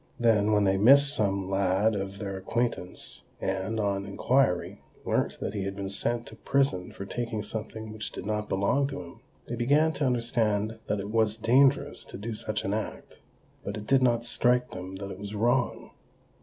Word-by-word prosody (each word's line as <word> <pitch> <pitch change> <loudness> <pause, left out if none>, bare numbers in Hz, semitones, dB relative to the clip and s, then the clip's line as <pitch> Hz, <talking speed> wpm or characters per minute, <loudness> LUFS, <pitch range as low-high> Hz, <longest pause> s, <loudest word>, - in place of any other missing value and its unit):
Then, 110 -3 +3
when 105 -1 +4
they 95 -1 +3
missed 140 +6 +7
some 100 -4 0
lad 95 +3 +2
of 100 0 -4
their 100 -2 -4
acquaintance, 105 0 -3 0.2
and, 95 +4 -2
on 100 -1 -1
inquiry, 100 -2 +1 0.2
learnt - - 0
that - - -3
he 100 - -2
had 95 0 -3
been 100 -1 -4
sent 115 +4 -2
to - - -11
prison 135 -10 +1
for 100 - -7
taking 115 0 -3
something 110 0 -6
which 110 0 -5
did - - -7
not 105 0 -2
belong 100 +9 +2
to 135 -10 -6
him, 85 - -13 0.3
they - - -5
began 145 +7 +3
to 145 -1 -1
understand 115 -3 0
that 105 - 0
it 100 +2 -5
was 110 -1 +2
dangerous 130 +5 +3
to - - -9
do 110 +4 -5
such 105 -1 -3
an 100 - 0
act—but 105 -1 -7
it 105 - -7
did 135 +2 +4
not 120 -2 +2
strike 125 +1 +2
them 90 +1 -7
that 100 0 -6
it 95 - -8
was 100 +1 -6
wrong. 120 +3 0
110 Hz, 185 wpm, -28 LUFS, 100-120 Hz, 0.3 s, missed